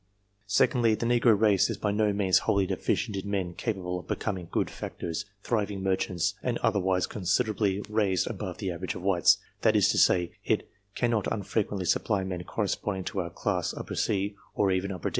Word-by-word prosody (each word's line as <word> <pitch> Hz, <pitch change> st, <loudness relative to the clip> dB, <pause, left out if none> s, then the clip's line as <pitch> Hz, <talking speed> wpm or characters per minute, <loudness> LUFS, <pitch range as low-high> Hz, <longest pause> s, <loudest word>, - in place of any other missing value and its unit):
Secondly, 115 Hz, +2 st, +3 dB
the 115 Hz, -, -3 dB
negro 120 Hz, -3 st, +4 dB
race 105 Hz, -4 st, +4 dB
is -, -, -3 dB
by 105 Hz, -, 0 dB
no 105 Hz, 0 st, +2 dB
means 100 Hz, -2 st, +3 dB
wholly 100 Hz, -1 st, +1 dB
deficient 100 Hz, -, -1 dB
in 95 Hz, +1 st, -4 dB
men 95 Hz, -4 st, -1 dB
capable 90 Hz, -4 st, -3 dB
of -, -, -13 dB
becoming 95 Hz, -5 st, -3 dB
good -, -, 0 dB
factors, 85 Hz, +1 st, -5 dB, 0.2 s
thriving 105 Hz, -4 st, -1 dB
mer 95 Hz, -1 st, +3 dB
chants, 90 Hz, +1 st, -1 dB
and 120 Hz, -2 st, -1 dB
otherwise 95 Hz, -3 st, +2 dB
considerably 105 Hz, 0 st, 0 dB
raised 105 Hz, -4 st, +1 dB
above -, -, -5 dB
the 95 Hz, -, -3 dB
average 90 Hz, +2 st, -4 dB
of 90 Hz, -, -7 dB
whites 95 Hz, -4 st, +4 dB, 0.2 s
that -, -, +3 dB
is -, -, +4 dB
to -, -, +2 dB
say, 90 Hz, -2 st, +4 dB
it -, -, 0 dB, 0.3 s
cannot 115 Hz, -4 st, 0 dB
unfrequently 100 Hz, -2 st, -1 dB
supply 95 Hz, +3 st, +1 dB
men 90 Hz, -2 st, -4 dB
corresponding 95 Hz, +1 st, -2 dB
to 105 Hz, +1 st, -3 dB
our 85 Hz, -2 st, -2 dB
class 90 Hz, +1 st, -2 dB, 0.2 s
C, 100 Hz, 0 st, 0 dB, 0.2 s
or 100 Hz, -2 st, +2 dB
even 95 Hz, +1 st, 0 dB
D. -, -, +1 dB
100 Hz, 180 wpm, -28 LUFS, 95-105 Hz, 0.3 s, negro